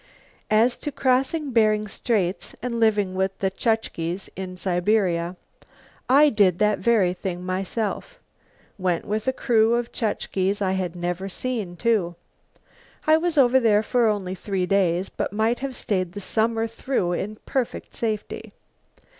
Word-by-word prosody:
As 225 +3 +3
to 295 - -5
crossing 270 +3 +1
Bering 215 -2 +3
Straits 195 -3 -1
and 240 -2 -2
living 210 -4 +2
with 190 +1 -1
the 190 -1 -1
Chukches 190 -5 -2
in 185 -1 -6
Siberia. 180 -2 +1 0.7
I 290 +3 +7
did 200 -7 +3
that 210 +1 +2
very 215 -7 +3
thing 180 -1 -5
myself 195 - -3 0.6
went 180 -3 0
with 215 +3 -2
a - - +4
crew 230 -3 +2
of 240 0 -2
Chukches 200 -3 -1
I 190 -2 0
had 185 -2 -2
never 180 +2 -3
seen, 215 -4 -3
too. 195 -5 +1 0.9
I 310 0 +6
was 335 -1 -1
over 260 -1 +6
there 215 -3 +3
for 240 +1 +2
only 200 -4 -1
three 190 0 -2
days 185 -1 +1
but - - -3
might 220 +3 +1
have 270 -1 -4
stayed 185 -6 -2
the 205 - -6
summer 225 +3 0
through 230 -5 -1
in 205 +4 -3
perfect 260 -4 -3
safety. 215 -2 -4
210 Hz, 145 wpm, -24 LUFS, 185-235 Hz, 0.9 s, I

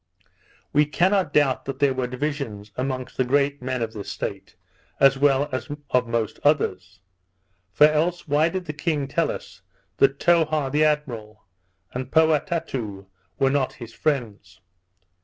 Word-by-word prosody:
We 150 0 +4
cannot 185 +2 +2
doubt 145 -3 +2
that 135 - -4
there 140 -2 +3
were 130 -1 -2
divisions 125 -6 -4
amongst 130 -1 -4
the 130 - +3
great 140 +2 +1
men 130 -1 -2
of 110 -1 -4
this 105 -2 -7
state, 100 -1 -6 0.4
as 135 0 +6
well 140 0 +3
as 130 - -3 0.2
of 125 -1 +2
most 115 -2 -2
others; 95 - 0 0.8
or 150 - +10
else 160 +3 +1
why 150 +3 +3
did 185 +1 -4
the 150 - -4
king 150 -2 -1
tell 165 +4 0
us, 95 0 -7 0.4
that 135 0 +4
Towha 155 -5 +2
the 150 +2 +3
admiral, 120 -9 -2 0.5
and 125 0 -4
Poatatou 155 - 0 0.3
were 135 0 +2
not 140 -2 0
his 115 -2 -10
friends? 105 - -3
135 Hz, 150 wpm, -24 LUFS, 120-150 Hz, 0.8 s, or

